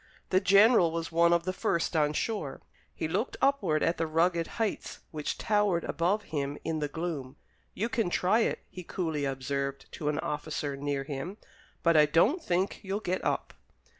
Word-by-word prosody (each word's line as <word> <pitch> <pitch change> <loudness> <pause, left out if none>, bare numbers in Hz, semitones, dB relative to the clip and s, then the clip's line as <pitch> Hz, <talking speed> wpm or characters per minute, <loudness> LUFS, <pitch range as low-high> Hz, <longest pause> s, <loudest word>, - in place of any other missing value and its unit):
The 185 - +5
general 200 -2 +6
was 165 0 -3
one 170 +1 +4
of 170 -1 +3
the 185 +1 -2
first 170 -2 0
on 150 -1 +2
shore. 180 -6 -3 0.3
He 160 - -2
looked 200 +10 -2
upward 200 - +2
at 165 - +1
the 165 - 0
rugged 165 +1 +2
heights 225 -3 -2
which 150 -3 -3
towered 205 -5 +1
above 195 +5 0
him 145 -3 -3
in 160 0 -1
the 150 - -1
gloom. 145 -4 -4 0.4
"You 220 - 0
can 235 -7 0
try 185 +5 +2
it," 230 - 0
he 180 - -9
coolly 160 -5 -2
observed 140 +1 -3
to 150 - -3
an 150 - -1
officer 150 -2 -3
near 140 0 -2
him; 145 +8 -5 0.5
"but 170 -1 +4
I 150 -1 +7
don't 205 - +3
think 180 +2 0
you'll 195 +1 -2
get 185 -3 -2
up." - - -1
165 Hz, 180 wpm, -29 LUFS, 150-190 Hz, 0.5 s, I